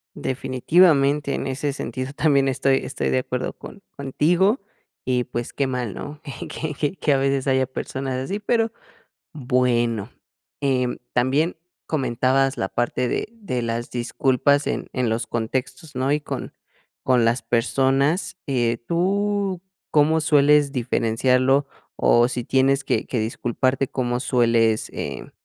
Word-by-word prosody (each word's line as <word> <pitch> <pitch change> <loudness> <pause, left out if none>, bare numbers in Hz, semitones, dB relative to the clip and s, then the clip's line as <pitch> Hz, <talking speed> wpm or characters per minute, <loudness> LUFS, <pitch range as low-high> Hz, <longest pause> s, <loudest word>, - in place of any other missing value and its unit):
Definitivamente, 140 +2 +2
en - - -3
ese 140 +2 -2
sentido, 130 -1 -5
también 140 -2 +2
estoy 135 0 +2
estoy - - -3
de 130 - +2
acuerdo 125 0 -3
con 200 - -11 0.2
contigo 175 - +2 0.5
y, 125 -1 +1
pues, 120 -1 -5
qué 140 - 0
mal, 125 -5 -3
¿no? 145 0 -8
Que 145 +2 -6
que 155 +5 -1
que 150 - +1
a - - +3
veces 135 0 0
haya 130 -1 +2
personas 130 0 -4
así, 135 +11 -3
pero 225 +2 +1 0.6
bueno, 120 -5 0 0.5
em, 130 -3 0 0.2
también 135 +7 +1 0.3
comentabas 135 -1 +1
la 95 - -1
parte 120 +1 -1
de 120 - -2
de 200 - -4
las 115 0 -3
disculpas 130 +3 +1
en - - -2
en 125 -2 0
los 115 +1 -1
contextos, 130 +7 -3
¿no? 130 +2 0
Y 150 - +2
con 145 - -6 0.5
con 125 -3 +3
las 115 +1 +1
personas, 135 +9 +1
eh, 120 -4 0
¿tú 195 +1 0 0.3
cómo 155 +2 +4
sueles 150 -2 +4
diferenciarlo? 130 +2 +2 0.3
O 120 0 +4
si 125 -1 -3
tienes 135 +2 +2
que - - 0
que 125 - -2
disculparte, 130 +4 0
¿cómo 120 -1 -2
sueles, 115 -4 +2
eh, - - -6
130 Hz, 140 wpm, -23 LUFS, 125-145 Hz, 0.6 s, cómo